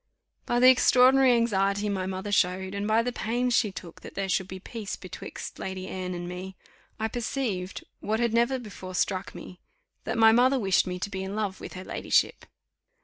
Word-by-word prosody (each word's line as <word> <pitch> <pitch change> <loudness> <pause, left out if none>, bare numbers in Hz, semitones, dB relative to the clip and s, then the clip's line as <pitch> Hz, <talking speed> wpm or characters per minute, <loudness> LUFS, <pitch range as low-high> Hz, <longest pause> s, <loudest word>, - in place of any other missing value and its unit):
By 240 - +2
the 255 - +7
extraordinary 255 +1 +5
anxiety 205 -3 +1
my 190 -2 -2
mother 190 +2 -4
showed, 190 0 +1
and 200 +1 -2
by 220 +1 +3
the 245 - -1
pains 245 +1 -1
she 215 -5 +2
took 175 -2 -10
that - - -11
there 195 -1 -2
should 185 0 0
be 190 0 -7
peace 215 +1 -6
betwixt - - -8
Lady 190 0 -5
Anne 185 -1 -4
and 175 0 -5
me, 185 +2 -7 0.4
I 220 - 0
perceived, 225 -5 -3 0.2
what 220 +2 -1
had 235 -2 +1
never 235 +3 +2
before 200 -6 -9
struck 185 +1 -1
me, 180 - -10 0.5
that - - -2
my 225 0 +7
mother 255 +4 +4
wished 195 -5 +2
me 180 0 -3
to 190 - -4
be 190 -1 -4
in 190 +1 -5
love 210 -3 -3
with - - -8
her 185 - -7
ladyship. - - 0
200 Hz, 200 wpm, -27 LUFS, 190-235 Hz, 0.5 s, the